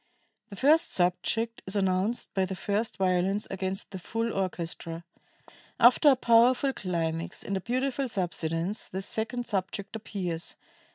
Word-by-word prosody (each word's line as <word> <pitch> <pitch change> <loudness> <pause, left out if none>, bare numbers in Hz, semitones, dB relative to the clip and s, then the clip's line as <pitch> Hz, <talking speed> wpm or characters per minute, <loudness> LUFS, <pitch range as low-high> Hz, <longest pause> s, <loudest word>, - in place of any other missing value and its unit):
The 200 - -8
first 310 - +4
subject 225 +6 0
is 190 - -4
announced 190 +3 0
by 190 -1 +2
the 190 +1 -4
first 205 +5 -2
violins 190 +2 +1
against 190 +1 -4
the 190 - -6
full 225 +5 -2
orchestra.... 170 -3 -3 0.8
After 250 +5 +7
a 270 - +6
powerful 250 +3 +4
climax 165 -5 -3
and 200 - -2
a 190 - -2
beautiful 260 +4 -1
subsidence,... 175 0 -1
the 190 +1 -4
second 230 +4 -2
subject 200 0 -3
appears 185 -6 -4
195 Hz, 135 wpm, -28 LUFS, 185-230 Hz, 0.8 s, After